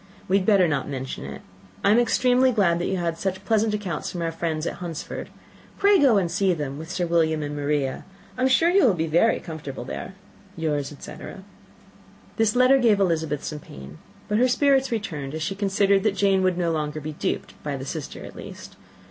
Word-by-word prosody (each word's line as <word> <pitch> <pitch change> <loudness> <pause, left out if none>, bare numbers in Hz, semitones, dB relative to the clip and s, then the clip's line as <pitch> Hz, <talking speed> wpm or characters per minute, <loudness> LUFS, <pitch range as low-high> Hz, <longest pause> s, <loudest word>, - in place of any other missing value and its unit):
We 190 - +3
had 185 - -5
better 195 -5 +5
not 145 -4 -1
mention 135 -1 -5
it. - - -8 0.4
I - - +4
am 225 - +5
extremely 250 +2 +3
glad 190 -7 +2
that 175 - -1
you 190 - -1
have 170 -2 -2
such 190 0 -3
pleasant 220 -1 +2
accounts 185 -7 -4
from 175 -2 -4
our 165 - -1
friends 160 -1 -3
at - - -3
Hunsford. 170 -4 -6 0.5
Pray 400 -1 +5
go 255 -8 +5
to 180 - 0
see 185 +1 +1
them, 145 -2 -4
with 160 +1 -8
Sir 180 0 -1
William 160 -2 +1
and 145 0 -4
Maria. 145 -2 -1 0.3
I 255 - -5
am 260 - +4
sure 325 +6 +4
you 390 +1 +4
will 215 -7 +4
be 160 -1 -1
very 170 +8 +3
comfortable 155 -6 -7
there. 190 - -6 0.4
"Yours, 150 -3 -1
etc." 170 +6 -9 0.9
This 225 -1 +2
letter 255 +2 +5
gave 225 -5 +4
Elizabeth 160 -6 0
some 150 - -5
pain; 70 - -12 0.3
but 210 +1 +1
her 250 - +5
spirits 270 +1 +2
returned, 155 -11 -4
as 160 - -3
she 180 - -2
considered 195 0 +2
that 205 -1 +1
Jane 195 -2 +3
would 185 -1 +1
no 170 -2 0
longer 155 -1 -2
be 155 +1 -6
duped, - - -3
by 145 -2 -3
the 130 - -7
sister 150 0 -6
at - - -11
least. - - -10
175 Hz, 210 wpm, -24 LUFS, 155-210 Hz, 0.9 s, better